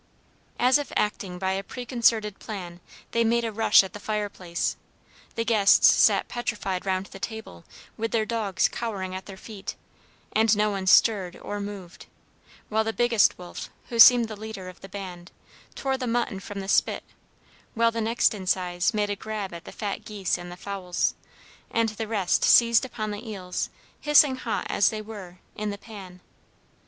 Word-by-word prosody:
As 255 Hz, +3 st, +5 dB
if 290 Hz, -, -6 dB
acting 195 Hz, -3 st, -1 dB
by 190 Hz, +1 st, -1 dB
a 195 Hz, +1 st, -2 dB
preconcerted 230 Hz, -3 st, 0 dB
plan, 180 Hz, -5 st, -7 dB, 0.3 s
they 230 Hz, -, +2 dB
made 235 Hz, +1 st, +2 dB
a 225 Hz, -, -2 dB
rush 210 Hz, -2 st, +5 dB
at 190 Hz, -, -8 dB
the 205 Hz, -, -7 dB
fireplace. 205 Hz, -5 st, -2 dB, 0.6 s
The 230 Hz, -, -1 dB
guests 215 Hz, -3 st, +5 dB
sat -, -, +4 dB
petrified 200 Hz, -6 st, -3 dB
round 190 Hz, 0 st, 0 dB
the 195 Hz, -, -12 dB
table, 220 Hz, -, -7 dB, 0.3 s
with 225 Hz, 0 st, -2 dB
their 225 Hz, -1 st, +1 dB
dogs 215 Hz, -5 st, 0 dB
cowering 195 Hz, -5 st, -4 dB
at 185 Hz, 0 st, -7 dB
their 195 Hz, -1 st, -9 dB
feet, 200 Hz, 0 st, -8 dB, 0.6 s
and 220 Hz, -1 st, +4 dB
no 210 Hz, 0 st, +2 dB
one 195 Hz, -1 st, -4 dB
stirred 190 Hz, -2 st, +4 dB
or 205 Hz, -, -6 dB
moved, 200 Hz, -3 st, -8 dB, 0.6 s
while 220 Hz, +1 st, +1 dB
the 225 Hz, 0 st, -2 dB
biggest 240 Hz, -3 st, +3 dB
wolf, 180 Hz, -1 st, -8 dB, 0.2 s
who 235 Hz, -, -4 dB
seemed 240 Hz, 0 st, +9 dB
the 220 Hz, -, -7 dB
leader 210 Hz, -3 st, -7 dB
of 185 Hz, -, -14 dB
the 195 Hz, -, -10 dB
band, 185 Hz, -2 st, -8 dB, 0.4 s
tore 265 Hz, -1 st, -1 dB
the 250 Hz, -, -3 dB
mutton 230 Hz, -4 st, -1 dB
from 200 Hz, 0 st, -7 dB
the 195 Hz, -, -7 dB
spit, -, -, +2 dB, 0.7 s
while 230 Hz, 0 st, +3 dB
the 230 Hz, 0 st, -3 dB
next 230 Hz, +2 st, +2 dB
in 190 Hz, -3 st, -7 dB
size 180 Hz, +2 st, 0 dB
made 205 Hz, -1 st, 0 dB
a -, -, -1 dB
grab 210 Hz, -2 st, -5 dB
at 170 Hz, 0 st, -9 dB
the -, -, -9 dB
fat 205 Hz, -2 st, -4 dB
geese 200 Hz, -4 st, -2 dB
and 175 Hz, 0 st, -7 dB
the 175 Hz, -, -9 dB
fowls, 185 Hz, -2 st, -2 dB, 0.6 s
and 230 Hz, -1 st, +1 dB
the 220 Hz, +1 st, -5 dB
rest 200 Hz, -5 st, +1 dB
seized 235 Hz, +1 st, +6 dB
upon 215 Hz, -4 st, -4 dB
the 215 Hz, +3 st, -7 dB
eels, 185 Hz, -4 st, -4 dB, 0.3 s
hissing 295 Hz, -2 st, +5 dB
hot 235 Hz, -3 st, -3 dB
as 205 Hz, -, +3 dB
they 220 Hz, -, -4 dB
were, 200 Hz, -5 st, -10 dB, 0.2 s
in 210 Hz, 0 st, -3 dB
the 200 Hz, -, -4 dB
pan. 195 Hz, -4 st, -11 dB
210 Hz, 180 wpm, -26 LUFS, 190-225 Hz, 0.7 s, seemed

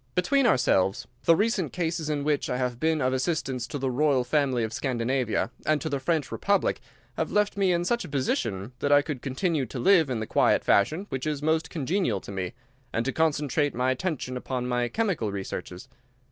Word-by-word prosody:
Between 265 Hz, +9 st, +3 dB
ourselves, 100 Hz, -, +2 dB, 0.2 s
the 165 Hz, -, +6 dB
recent 200 Hz, -, 0 dB
cases 165 Hz, -3 st, -2 dB
in 145 Hz, -2 st, -1 dB
which 150 Hz, -1 st, 0 dB
I 125 Hz, -, -1 dB
have 125 Hz, -2 st, -2 dB
been 160 Hz, 0 st, +1 dB
of 130 Hz, 0 st, +1 dB
assistance 130 Hz, -3 st, -1 dB
to 145 Hz, -, -4 dB
the 135 Hz, -1 st, -1 dB
royal 135 Hz, -1 st, +2 dB
family 130 Hz, -2 st, +1 dB
of 110 Hz, 0 st, -3 dB
Scandinavia, 125 Hz, -1 st, -1 dB
and 155 Hz, -1 st, +2 dB
to 160 Hz, -, -3 dB
the 140 Hz, -2 st, -1 dB
French 155 Hz, +1 st, -1 dB
republic, 200 Hz, -1 st, +1 dB, 0.4 s
have -, -, -1 dB
left 210 Hz, 0 st, +1 dB
me 195 Hz, -2 st, +2 dB
in 175 Hz, 0 st, +1 dB
such 240 Hz, +5 st, 0 dB
a 180 Hz, -, -8 dB
position 115 Hz, -6 st, -1 dB
that 145 Hz, -, 0 dB
I 145 Hz, 0 st, +6 dB
could 145 Hz, -5 st, -5 dB
continue 145 Hz, 0 st, -1 dB
to 125 Hz, -, -7 dB
live 165 Hz, +2 st, +4 dB
in 125 Hz, -3 st, -1 dB
the 110 Hz, -, -3 dB
quiet -, -, +3 dB
fashion 155 Hz, -, +2 dB
which 130 Hz, +2 st, -3 dB
is 150 Hz, -1 st, -2 dB
most 160 Hz, 0 st, +1 dB
congenial 155 Hz, -, 0 dB
to -, -, -9 dB
me, 95 Hz, -2 st, -4 dB, 0.4 s
and 115 Hz, +1 st, -1 dB
to 135 Hz, -, -1 dB
concentrate 150 Hz, -2 st, +1 dB
my 125 Hz, +2 st, +1 dB
attention 130 Hz, -3 st, -3 dB
upon 125 Hz, 0 st, -3 dB
my 125 Hz, -1 st, 0 dB
chemical 180 Hz, -, -1 dB
researches. 95 Hz, -2 st, -6 dB
140 Hz, 200 wpm, -27 LUFS, 125-160 Hz, 0.4 s, the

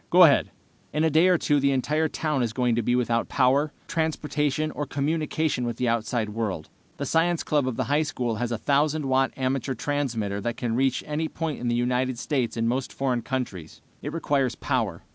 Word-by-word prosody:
Go 180 Hz, +1 st, +7 dB
ahead." 145 Hz, -5 st, +5 dB, 0.4 s
"In 150 Hz, +2 st, +1 dB
a 160 Hz, -, +3 dB
day 160 Hz, +4 st, +5 dB
or 180 Hz, -1 st, +5 dB
two 145 Hz, -2 st, +2 dB
the 140 Hz, 0 st, +2 dB
entire 150 Hz, +4 st, +1 dB
town 150 Hz, -3 st, -1 dB
is 115 Hz, -2 st, -1 dB
going 125 Hz, -1 st, +1 dB
to 120 Hz, -, +1 dB
be 120 Hz, +2 st, +1 dB
without 120 Hz, -2 st, 0 dB
power, 140 Hz, +3 st, +3 dB, 0.2 s
transportation, 155 Hz, -2 st, -1 dB
or 145 Hz, -1 st, -4 dB
communication 150 Hz, -1 st, -1 dB
with 120 Hz, -1 st, -3 dB
the 125 Hz, -, 0 dB
outside 115 Hz, -1 st, 0 dB
world. 105 Hz, -7 st, -3 dB, 0.3 s
The 140 Hz, -, -3 dB
science 165 Hz, +4 st, +1 dB
club 145 Hz, -3 st, +1 dB
of 130 Hz, -, -2 dB
the -, -, 0 dB
high 145 Hz, +2 st, +2 dB
school 125 Hz, -7 st, -2 dB
has 120 Hz, +1 st, -2 dB
a -, -, 0 dB
1000 145 Hz, +5 st, +1 dB
watt 135 Hz, 0 st, +2 dB
amateur 130 Hz, 0 st, -1 dB
transmitter 115 Hz, -8 st, -2 dB
that 120 Hz, +3 st, -3 dB
can 115 Hz, -2 st, -1 dB
reach 130 Hz, 0 st, +1 dB
any 155 Hz, +2 st, -2 dB
point 160 Hz, -2 st, -4 dB
in 120 Hz, -, -3 dB
the 120 Hz, -, +1 dB
United 125 Hz, +1 st, 0 dB
States 125 Hz, -3 st, -1 dB
and 115 Hz, 0 st, +1 dB
most 125 Hz, +2 st, -1 dB
foreign 130 Hz, -3 st, -1 dB
countries. 115 Hz, -, -5 dB, 0.2 s
It -, -, -4 dB
requires 140 Hz, -6 st, 0 dB
power. -, -, -2 dB
135 Hz, 205 wpm, -26 LUFS, 120-150 Hz, 0.4 s, Go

